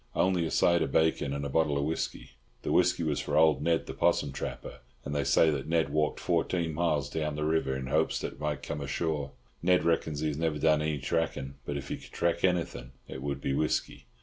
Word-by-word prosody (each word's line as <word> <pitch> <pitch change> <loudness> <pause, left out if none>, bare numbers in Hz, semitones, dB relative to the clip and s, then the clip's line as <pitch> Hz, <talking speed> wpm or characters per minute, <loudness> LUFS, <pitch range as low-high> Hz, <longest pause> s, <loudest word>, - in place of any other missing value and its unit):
"Only 90 -3 +2
a - - -4
side 85 +1 +3
of 80 - -1
bacon 80 -3 +2
and 70 0 -3
a - - -3
bottle 75 0 +2
of 70 - 0
whisky. 80 -3 -3 0.3
The - - -2
whisky 90 -1 +3
was 75 -3 0
for - - -1
old 80 -1 +5
Ned 85 -1 +1
the - - -6
'possum 70 - +1
trapper, - - -6 0.3
and 70 - -4
they 70 -1 0
say 70 +4 +4
that 70 -3 -3
Ned 80 0 +1
walked 75 0 0
fourteen 85 -3 0
miles 75 -4 +1
down 75 +1 -2
the 75 - -2
river 80 -4 +1
in 65 - -5
hopes 80 +4 +1
that - - -4
it - - -18
might 75 - -1 0.2
have - - -4
come - - -6
ashore. 70 0 -2 0.3
Ned 90 -1 +3
reckons 80 -3 0
he 80 - +1
has 75 - -3
never 80 -2 0
done 75 0 +3
any 75 -1 -1
tracking, 70 -1 -2
but 75 - -2
if 70 0 -7
he - - -3
could - - -14
track 85 0 0
anything 85 -9 0
it 65 - -7
would 70 0 -3
be 70 - -1
whisky." 75 +3 -1
75 Hz, 235 wpm, -29 LUFS, 70-80 Hz, 0.3 s, old